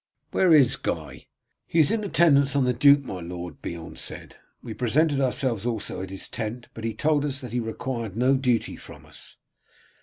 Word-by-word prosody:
Where 185 -2 +3
is 145 -6 +5
Guy?" - - -5 0.4
"He 165 - +1
is 150 - +5
in 225 -1 0
attendance 140 -8 +3
on 140 - +3
the 125 0 +2
duke, 140 +2 +5
my 95 -8 -6
lord," 85 -1 -8
Beorn 85 -1 -7
said. - - -7 0.3
"We 115 - -6
presented 140 +5 +1
ourselves 125 -4 0
also 110 -6 -3
at 95 - -6
his 95 0 -4
tent, 115 +2 -5
but 115 - -9
he 115 -1 -3
told 150 +2 +1
us 140 -1 -2
that 125 -2 -8
he 125 - 0
required 115 -2 -4
no 130 +3 +3
duty 125 -3 0
from - - -13
us." - - -12
125 Hz, 190 wpm, -25 LUFS, 110-140 Hz, 0.4 s, is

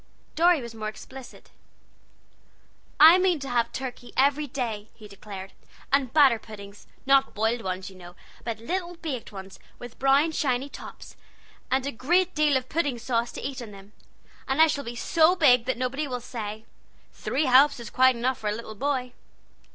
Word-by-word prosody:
Dorry 335 -3 +3
was 235 -1 -8
more 215 -1 -5
explicit. 260 +4 -11 1.5
"I 325 +4 +9
mean 365 -2 +2
to 275 - -5
have 235 -1 0
turkey 250 -2 -7
every 285 +3 +2
day," 230 -6 -4
he 215 - -13
declared, 200 -1 -10 0.4
"and 270 -3 +2
batter 275 -6 +5
puddings; 205 -2 -12 0.2
not 275 0 +3
boiled 225 +3 0
ones, 185 0 -5
you - - -15
know, 175 -1 -13 0.3
but 230 -2 -4
little 350 +9 -4
baked 295 -10 -6
ones, 190 -1 -10 0.2
with 245 -1 -11
brown 275 +4 +3
shiny 270 -3 -1
tops, - - -11 0.5
and 265 0 +1
a 280 - -2
great 350 +10 +1
deal 300 -3 +3
of 255 0 -5
pudding 290 -5 -1
sauce 235 0 -1
to - - -7
eat 270 -2 -7
on 230 - -8
them. 200 0 -14 0.5
And 270 +2 -1
I 320 - +9
shall 285 -3 -2
be 235 +1 -6
so 325 +7 +3
big 250 -9 +4
then 260 -1 -1
that - - -13
nobody 270 +4 -2
will 250 -2 -4
say, 220 -2 -7 0.5
'Three 295 +4 -1
helps 275 +2 +5
is 230 -3 -9
quite 260 0 +4
enough 245 +2 -1
for 215 - -4
a - - -1
little 225 -1 -8
boy.'" 255 +1 -2
255 Hz, 180 wpm, -26 LUFS, 225-285 Hz, 1.5 s, I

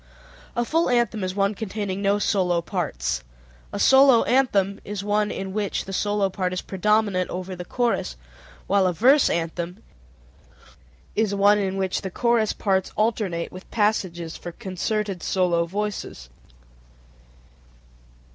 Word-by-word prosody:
A 240 - 0
full 330 +4 +1
anthem 235 -4 +1
is 185 0 -3
one 200 +1 +1
containing 200 -2 -4
no 200 0 +2
solo 185 -4 +1
parts; 170 - -2 0.5
a - - -4
solo 265 -3 +6
anthem 205 -7 +2
is 200 -1 -5
one 210 0 +1
in 190 -2 -5
which 210 -1 -2
the 195 - -7
solo 205 0 +1
part 185 -1 -2
is 185 - -2
predominant 200 -1 +1
over 185 +1 -5
the 180 - -6
chorus, 235 - -1 0.5
while 195 -1 +3
a 180 - 0
verse 260 - +5
anthem 170 +3 -3 1.3
is 210 -2 +1
one 205 +1 +5
in 195 -1 -1
which 190 -1 -1
the 190 - -4
chorus 235 +2 +1
parts 190 -2 0
alternate 210 -6 -1
with 185 +1 -11
passages 185 -6 -1
for 175 - -7
concerted 195 +1 -3
solo 175 -3 +1
voices 200 - -4 0.2
(_i. - - -27
195 Hz, 140 wpm, -24 LUFS, 185-215 Hz, 1.3 s, solo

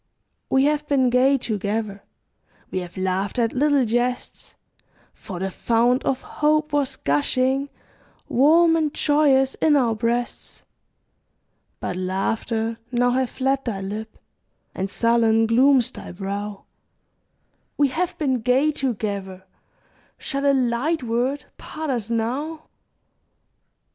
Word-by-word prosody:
We 265 0 +3
have 300 0 0
been 260 -3 +2
gay 265 +3 +4
together; 210 -3 -3 0.7
We 185 - -1
have 175 0 -9
laughed 190 +2 -1
at 230 -2 +1
little 280 -1 +2
jests; 240 +2 -2 0.6
For 185 - -9
the 190 +2 -3
fount 240 +5 +1
of 265 - -1
hope 305 0 0
was 285 -2 0
gushing 255 - 0 0.6
Warm 325 +6 +4
and 310 -2 +1
joyous 280 -3 +3
in 310 -2 +4
our 245 -5 +2
breasts, 235 +2 -3 1.2
But 180 - -4
laughter 220 +5 -2
now 245 0 +2
hath 255 0 0
fled 270 +1 -1
thy 205 -5 -3
lip, 215 +3 -6 0.6
And 190 +1 -3
sullen 225 0 +3
glooms 250 +2 +4
thy - - -9
brow; 200 +2 -5 1.1
We 285 -1 +3
have 350 +5 -2
been 270 -6 0
gay 260 +6 +3
together, 200 -8 -4 0.7
Shall 280 -1 -2
a 280 - +5
light 260 +4 0
word 245 +5 -1
part 310 -2 -5
us 235 -4 -3
now? 270 +8 -2
245 Hz, 120 wpm, -23 LUFS, 220-280 Hz, 1.2 s, a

